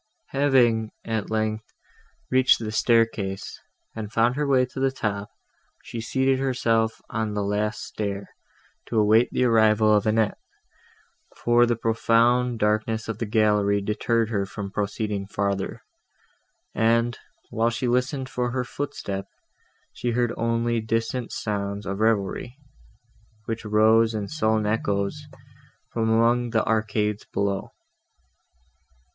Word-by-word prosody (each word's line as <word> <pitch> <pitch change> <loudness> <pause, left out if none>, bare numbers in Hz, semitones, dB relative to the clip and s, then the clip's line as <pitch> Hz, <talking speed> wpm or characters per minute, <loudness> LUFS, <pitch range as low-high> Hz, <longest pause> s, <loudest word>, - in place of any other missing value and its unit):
Having, 125 -6 +2
at 110 -2 -2
length, 110 0 -2 0.6
reached 130 0 +5
the 110 -2 -5
staircase, 110 -3 0 0.4
and 110 -2 -6
found 115 +2 +2
her 145 0 -1
way 130 -2 +4
to 125 - -9
the 135 0 +2
top, 105 -6 -3 0.5
she 115 - -6
seated 130 +3 +1
herself 115 -4 0
on 110 -2 -2
the 105 - -1
last 105 +1 -1
stair, 100 -1 -4 0.6
to 115 - -2
await 110 +3 +4
the - - 0
arrival 110 -2 +4
of 105 0 +2
Annette; 110 -1 +1 1.0
for 120 0 +4
the 120 - +1
profound 115 +2 +2
darkness 110 +1 0
of 115 -1 -4
the 115 - -2
gallery 105 -2 +2
deterred 110 +2 0
her 100 -3 -1
from 100 0 -6
proceeding 100 0 -2
farther, 100 -1 -2 0.9
and, 115 +1 +2 0.3
while 115 +1 +1
she 120 +2 -2
listened 130 +2 0
for 125 -2 -2
her 125 +1 -1
footstep, 100 -8 -5 0.7
she 120 - -3
heard 120 0 0
only 115 0 0
distant 115 +2 -2
sounds 100 -1 -3
of 100 +1 -4
revelry, 110 +3 0 0.9
which 115 0 -4
rose 110 +1 +4
in 105 -2 -3
sullen 110 -7 0
echoes 105 +6 -1 0.6
from 110 -1 0
among 120 +2 +3
the 115 -1 +1
arcades 105 -1 0
below. 100 -1 -1
110 Hz, 130 wpm, -24 LUFS, 105-120 Hz, 1.0 s, reached